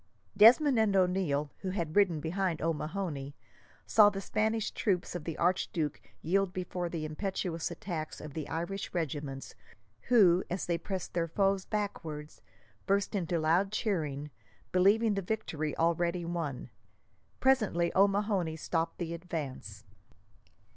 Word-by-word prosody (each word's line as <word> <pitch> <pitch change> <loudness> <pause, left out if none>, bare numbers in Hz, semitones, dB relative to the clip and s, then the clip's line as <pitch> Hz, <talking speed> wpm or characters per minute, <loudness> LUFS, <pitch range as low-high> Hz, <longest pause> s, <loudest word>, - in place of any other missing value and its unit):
Desmond 240 +5 +7
and 210 -3 +3
O'Neil, 180 -6 +1
who 190 - -4
had 170 -5 -3
ridden 185 -6 +4
behind 170 +1 -1
O'Mahony, 155 -3 -3 0.5
saw 210 -2 +6
the 200 -1 -5
Spanish 220 +2 0
troops 185 -5 -1
of 175 -4 -5
the 165 -2 -4
archduke 175 -3 0 0.2
yield 190 +3 +1
before 180 -1 -3
the 165 -2 -4
impetuous 165 0 -3
attacks 160 -5 -5
of 150 -2 -8
the 155 -1 -5
Irish 170 +5 -3
regiments, 145 -4 -3 0.5
who, 190 -7 +5
as 180 0 -2
they 170 -1 -1
pressed 190 +1 -5
their 170 -1 0
foes 195 +2 +1
backwards, 160 -8 -4 0.5
burst 200 0 +1
into 175 -4 -1
loud 170 +5 +2
cheering, 150 - -2 0.4
believing 205 +4 +4
the 200 - -1
victory 160 -7 -3
already 170 +1 +1
won. 155 -8 -4 0.7
Presently, 215 -10 +2
O'Mahony 195 -4 +2
stopped 165 +1 -2
the 170 -1 -3
advance. 140 - -6
175 Hz, 130 wpm, -31 LUFS, 160-195 Hz, 0.7 s, Desmond